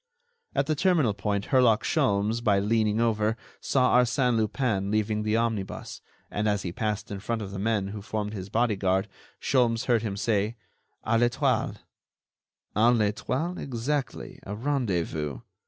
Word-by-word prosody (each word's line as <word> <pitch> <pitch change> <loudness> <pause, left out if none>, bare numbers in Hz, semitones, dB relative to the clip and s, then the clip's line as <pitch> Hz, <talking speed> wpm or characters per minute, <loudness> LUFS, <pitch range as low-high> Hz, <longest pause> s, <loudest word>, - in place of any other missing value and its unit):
At 140 - +2
the 155 - +1
terminal 155 - +2
point 100 -1 -2
Herlock 125 -5 +4
Sholmes, 105 +4 +1
by 105 -4 +4
leaning 105 +1 +1
over, 110 -1 +1 0.2
saw 130 -2 +2
Arsène 125 0 +2
Lupin 110 -3 0
leaving 105 0 0
the 110 +1 +1
omnibus, 115 -4 -3 0.3
and 105 +1 0
as 105 -1 0
he 85 - -3
passed 105 +2 -3
in 100 - -4
front 110 +2 -2
of 100 - -7
the 100 - -5
men 105 -2 0
who 105 0 -6
formed 105 0 -3
his 95 -2 -6
bodyguard 100 -4 +1 0.3
Sholmes 120 -4 +2
heard 120 -3 +3
him 105 -3 -3
say: 105 +1 0 0.5
"A 115 +1 +2
l'Etoile." 125 0 +1 1.0
"A 115 +3 +5
l'Etoile, 125 +10 0
exactly, 135 +2 -3
a 100 - -6
rendezvous. 90 - -1
110 Hz, 150 wpm, -27 LUFS, 100-120 Hz, 1.0 s, A